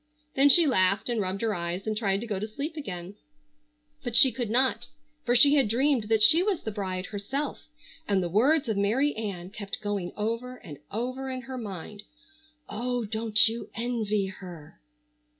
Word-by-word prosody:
Then 275 +2 +5
she 340 +3 +7
laughed 195 -5 +2
and 235 -3 0
rubbed 190 0 -3
her 225 -2 0
eyes 175 +1 -4
and 215 -1 -1
tried 200 -2 0
to - - -4
go 210 -4 -3
to 215 - -3
sleep 280 +8 -5
again; 195 - -7 0.9
but 245 -3 -4
she 265 +1 +7
could 240 -4 -4
not, 255 +3 +2 0.4
for 245 - +1
she 280 +4 +7
had 275 -6 +4
dreamed 250 +1 +1
that 220 0 +2
she 315 +10 +6
was 390 -2 0
the 220 - -3
bride 190 -3 -4
herself, 265 +11 -4 0.4
and 195 -2 +1
the - - -1
words 260 - +3
of 220 -3 -1
Mary 240 +9 +1
Ann 195 -5 -5
kept 200 -2 -6
going 200 -4 -3
over 230 +4 -3
and 160 - -11
over 255 +5 -4
in 255 -1 -4
her 260 0 -8
mind. 205 -1 -7 0.7
"Oh, 245 +1 -2
don't 220 0 +3
you 230 +1 -4
envy 225 -4 -1
her?" 180 - -10
220 Hz, 185 wpm, -27 LUFS, 200-255 Hz, 0.9 s, she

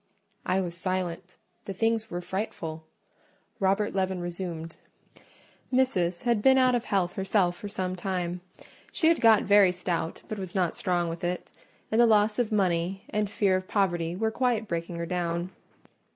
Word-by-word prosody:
I 185 +1 +2
was 175 -2 -4
silent: 185 -1 -3 0.3
the 195 - -5
tidings 225 +1 0
were 175 -2 -4
frightful. 170 -4 -5 0.7
Robert 195 +2 +1
Leaven 190 -1 0
resumed— 170 -2 -5 0.9
"Missis 185 -10 +1
had 235 -3 +2
been 265 +3 +6
out 255 -1 +4
of 245 -1 0
health 185 -3 0
herself 190 -2 +1
for 205 - -7
some 185 -2 -3
time: 180 -1 -3 0.5
she 320 - +3
had 335 - +2
got 225 -2 +6
very 200 -2 +6
stout, 175 -2 -3
but 215 - -5
was 190 -1 -6
not 180 -3 +1
strong 175 -2 0
with 165 +1 -6
it; 175 +1 -3 0.4
and 220 +2 +4
the 240 - +6
loss 210 0 +3
of 235 -3 0
money 185 -2 0
and 210 -1 0
fear 200 -2 +2
of 185 0 -3
poverty 175 -4 0
were 220 +3 0
quite 235 -2 0
breaking 170 0 -3
her 170 0 -3
down. 175 0 -2
185 Hz, 165 wpm, -27 LUFS, 175-210 Hz, 0.9 s, been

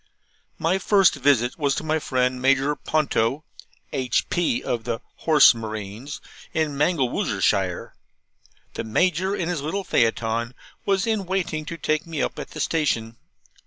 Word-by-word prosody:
My 175 +4 +1
first 195 -1 +4
visit 135 -2 +2
was 140 -2 +1
to - - -3
my 155 0 0
friend 125 -2 0
Major 135 +2 +3
Ponto 140 -2 0 0.5
(H.P. 130 +2 0
of 115 -2 -2
the 115 -1 -3 0.2
Horse 155 -4 +6
Marines), 110 +3 -6 0.4
in 155 -2 0
Mangelwurzelshire. 145 -3 0 0.8
The - - -4
Major, 180 - +1
in 170 - -2
his 175 -5 -2
little 190 +7 -2
phaeton, 115 -3 0 0.3
was 195 +1 +2
in 215 -5 -1
waiting 175 -5 -2
to 170 - -6
take 155 0 -1
me 160 -3 -4
up - - -2
at - - -6
the 155 - -9
station. 135 -8 0
145 Hz, 140 wpm, -24 LUFS, 125-165 Hz, 0.8 s, Horse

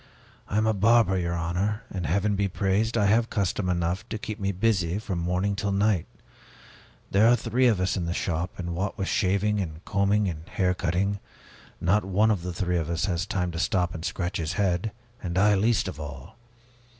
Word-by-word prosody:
I 100 - -1
am 110 - +3
a 110 - +3
barber, 105 0 +4
your 85 -2 -1
honor, 90 +6 -1
and 90 -5 -3
Heaven 100 +6 +1
be 100 0 +1
praised! 100 +4 0
I 105 - +3
have 115 +3 +3
custom 100 -2 -1
enough 85 +1 -1
to 110 - -3
keep 110 0 -6
me 100 0 0
busy 95 -3 +1
from 100 -4 -3
morning 90 +4 0
till 100 0 -1
night. 100 -3 +1 1.0
There 105 +3 +5
are 120 - +6
three 125 +2 +2
of 110 -6 +3
us 95 +1 +1
in 85 -3 -2
the - - -1
shop, 85 +1 -1
and 85 -1 -4
what 95 +3 -2
with 95 - -2
shaving 100 +3 +1
and 80 -2 -6
combing 100 +1 +2
and 80 +1 -6
hair 90 -3 +1
cutting, 90 +3 -1 0.6
not 100 +5 +2
one 100 +4 +2
of 100 -5 0
the 90 +1 -4
three 90 0 -1
has 85 0 -1
the 90 -2 0
time 90 -2 -1
to 85 - -5
stop 90 -1 +1
and 80 - -6
scratch 90 0 -2
his 80 0 -2
head, 95 0 0 0.3
and 90 -1 -3
I 105 +2 +5
least 105 +1 +2
of 90 - -6
all. 70 -3 -8
95 Hz, 205 wpm, -26 LUFS, 85-105 Hz, 1.0 s, are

